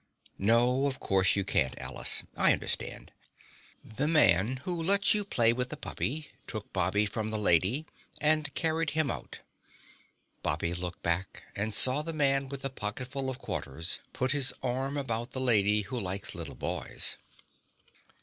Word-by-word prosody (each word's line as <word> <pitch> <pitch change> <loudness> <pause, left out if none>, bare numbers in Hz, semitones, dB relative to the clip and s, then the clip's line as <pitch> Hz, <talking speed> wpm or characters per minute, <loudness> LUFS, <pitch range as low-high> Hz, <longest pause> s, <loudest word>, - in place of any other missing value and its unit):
"No, 120 +6 +2
of 135 -2 -4
course, 95 -1 +2
you 100 - 0
can't, 70 -9 0
Alice, - - +1
I - - +5
understand." - - -5 0.7
The 135 +7 -3
Man 120 - +3
Who 175 -2 -3
Lets 200 +4 +5
You 210 -1 +2
Play 115 - +2
with 125 +1 -3
the - - -4
Puppy 150 +4 -5 0.2
took 110 -3 -7
Bobby 95 +3 +1
from 110 +1 -4
the 110 - -2
Lady 105 - +3 0.3
and 155 0 +2
carried 160 0 0
him 155 -3 +3
out. - - -7 1.0
Bobby 85 - -2
looked 90 0 -6
back 85 +2 -3
and 105 +2 -2
saw 130 +7 +7
the 165 +2 -4
Man 140 -3 +1
with 140 -1 -7
the 135 - -2
Pocketful 130 +4 -5
of 130 - -5
Quarters 80 - -4
put 130 +1 -1
his 135 -3 +3
arm 135 +3 -2
about 120 -3 -3
the 130 - -3
Lady 105 -4 +3
Who 115 +5 -5
Likes 95 -1 -2
Little 80 -6 -7
Boys. - - -1
125 Hz, 160 wpm, -29 LUFS, 100-140 Hz, 1.0 s, saw